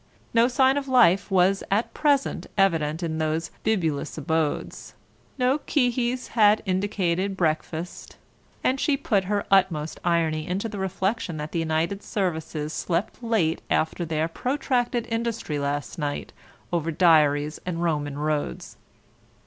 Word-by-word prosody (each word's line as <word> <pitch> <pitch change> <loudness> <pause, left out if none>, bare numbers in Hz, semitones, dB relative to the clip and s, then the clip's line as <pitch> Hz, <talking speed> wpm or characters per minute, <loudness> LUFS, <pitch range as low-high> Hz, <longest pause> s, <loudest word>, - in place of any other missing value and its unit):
No 230 +1 +5
sign 265 +2 +3
of 280 -1 -2
life 220 -8 +4
was 190 +1 +3
at 210 +4 0
present 290 -2 +1
evident 165 -4 +2
in 160 -1 -2
those 160 +2 -1
bibulous 165 -10 -1
abodes, 160 0 -2 0.4
no 260 +3 +2
qui 255 -4 +1
his 250 +1 -2
had 215 -2 +4
indicated 190 -1 0
breakfast, 160 +1 -2 0.5
and 265 +1 +1
she 280 0 +2
put 200 -7 +1
her 205 +1 -1
utmost 165 -5 +2
irony 165 -2 +1
into 190 +5 -2
the 205 -2 -6
reflection 190 -1 -2
that 150 0 -5
the 170 - -1
United 165 +4 -1
Services 160 -5 -3
slept 175 +7 -2
late 220 -9 +1
after 160 +2 0
their 160 -1 -1
protracted 245 - -1
industry 225 -9 -2
last 145 +4 -3
night 145 -1 -3 0.4
over 165 -1 0
diaries 150 -3 +3
and 175 -1 -3
Roman 145 -4 -1
roads. 150 0 -3
180 Hz, 135 wpm, -25 LUFS, 160-220 Hz, 0.5 s, No